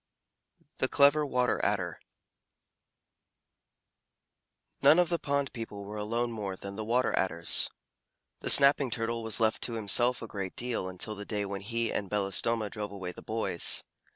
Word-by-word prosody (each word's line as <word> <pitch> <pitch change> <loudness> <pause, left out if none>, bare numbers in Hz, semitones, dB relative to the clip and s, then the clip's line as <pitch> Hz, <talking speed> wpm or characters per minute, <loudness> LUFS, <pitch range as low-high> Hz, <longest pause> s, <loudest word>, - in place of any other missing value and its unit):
THE - - +2
CLEVER 145 +1 +4
WATER 125 -2 0
ADDER 90 -5 -1 2.8
None 155 - +7
of 180 -2 +3
the 170 -1 0
pond 140 -2 -1
people 110 -4 -7
were 105 +1 -7
alone 115 +3 -2
more 100 -4 -4
than 100 +1 -8
the 110 - -4
Water 120 +4 +1
Adders. 85 -3 +1 0.7
The - - -3
Snapping 140 -1 +7
Turtle 115 -1 -2
was 110 0 -3
left 110 -1 +1
to 120 - 0
himself 115 +3 +2
a - - -6
great 95 -3 -5
deal 120 -7 -2
until 95 +4 -5
the 105 0 -7
day 105 -1 -3
when 100 -1 -5
he 115 +2 -2
and 100 -2 -3
Belostoma 105 +2 0
drove 105 -2 -5
away 95 -3 -6
the - - -12
boys. 110 -6 -1
110 Hz, 155 wpm, -29 LUFS, 100-120 Hz, 2.8 s, None